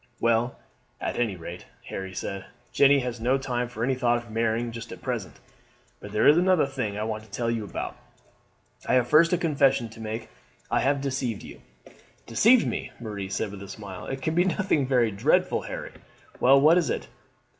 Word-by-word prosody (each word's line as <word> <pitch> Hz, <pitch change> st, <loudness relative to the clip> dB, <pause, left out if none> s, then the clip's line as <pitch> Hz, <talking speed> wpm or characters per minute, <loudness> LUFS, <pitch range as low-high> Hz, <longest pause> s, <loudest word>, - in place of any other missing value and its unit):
"Well, 115 Hz, +1 st, +2 dB, 0.4 s
at -, -, -3 dB
anyrate," 90 Hz, -7 st, -3 dB, 0.2 s
Harry 95 Hz, -1 st, -6 dB
said, 95 Hz, +1 st, -4 dB, 0.3 s
"Jeanne 140 Hz, 0 st, +5 dB
has 125 Hz, -2 st, -4 dB
no 125 Hz, +3 st, +2 dB
time 125 Hz, -2 st, -2 dB
for 115 Hz, -1 st, -5 dB
any 130 Hz, +2 st, +2 dB
thought 120 Hz, -2 st, +2 dB
of 120 Hz, -1 st, -9 dB
marrying 115 Hz, +1 st, 0 dB
just 115 Hz, 0 st, -8 dB
at -, -, -8 dB
present. -, -, -3 dB, 0.6 s
But 105 Hz, -, -10 dB
there 105 Hz, -, +3 dB
is 150 Hz, +3 st, +7 dB
another 180 Hz, -4 st, +4 dB
thing 115 Hz, -7 st, -3 dB
I 105 Hz, -, -2 dB
want 110 Hz, -1 st, -3 dB
to 110 Hz, -, -18 dB
tell 115 Hz, +3 st, -1 dB
you 115 Hz, -2 st, -2 dB
about. 100 Hz, -, -5 dB, 0.9 s
I -, -, +3 dB
have 125 Hz, -1 st, +3 dB
first 155 Hz, +5 st, +5 dB
a 180 Hz, -, +3 dB
confession 140 Hz, -7 st, +2 dB
to 110 Hz, -, -14 dB
make. 110 Hz, +1 st, -5 dB, 0.4 s
I -, -, +3 dB
have 140 Hz, +1 st, +1 dB
deceived 130 Hz, -5 st, -2 dB
you." -, -, -11 dB, 0.6 s
"Deceived 225 Hz, -, +5 dB
me!" -, -, -3 dB
Marie 105 Hz, -4 st, -5 dB
said 105 Hz, +1 st, -2 dB
with 100 Hz, -1 st, -9 dB
a 100 Hz, -, -8 dB
smile. 100 Hz, -2 st, -8 dB
"It 135 Hz, 0 st, -5 dB
can 160 Hz, -, 0 dB
be 175 Hz, +2 st, +4 dB
nothing 185 Hz, -7 st, +1 dB
very 125 Hz, -4 st, +3 dB
dreadful, 100 Hz, -, +2 dB
Harry. -, -, -6 dB, 0.5 s
Well, 135 Hz, +2 st, +6 dB
what 160 Hz, +5 st, +6 dB
is 170 Hz, -, -1 dB
it?" -, -, -2 dB
120 Hz, 195 wpm, -26 LUFS, 110-140 Hz, 0.9 s, is